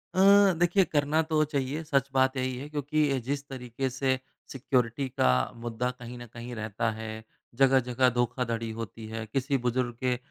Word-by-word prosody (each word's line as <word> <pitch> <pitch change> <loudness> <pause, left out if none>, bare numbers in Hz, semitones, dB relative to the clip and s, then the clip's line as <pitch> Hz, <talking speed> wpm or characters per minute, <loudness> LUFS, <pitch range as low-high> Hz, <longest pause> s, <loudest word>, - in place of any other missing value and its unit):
अ, 200 +1 +6
देखिए 175 +3 +4
करना 150 +1 +1
तो 155 -1 +2
चाहिए 145 +1 -2
सच 140 -2 +1
बात 130 0 +3
यही 130 0 -1
है, 145 +3 -7
क्योंकि 145 -2 0
जिस 140 +3 -3
तरीके 130 0 -4
से 130 0 0 0.3
सिक्योरिटी 130 0 0
का 65 - +2
मुद्दा 120 +1 -3
कहीं 125 -1 -10
न 120 - -8
कहीं 120 +2 -8
रहता 110 +1 -2
है, 110 0 -7 0.3
जगह-जगह 130 -1 +4
धोखाधड़ी 115 -2 -1
होती 115 0 -7
है, 110 0 -5
किसी 135 +5 0
बुज़ुर्ग 125 0 -1
के 125 -1 +2
130 Hz, 165 wpm, -28 LUFS, 115-140 Hz, 0.3 s, अ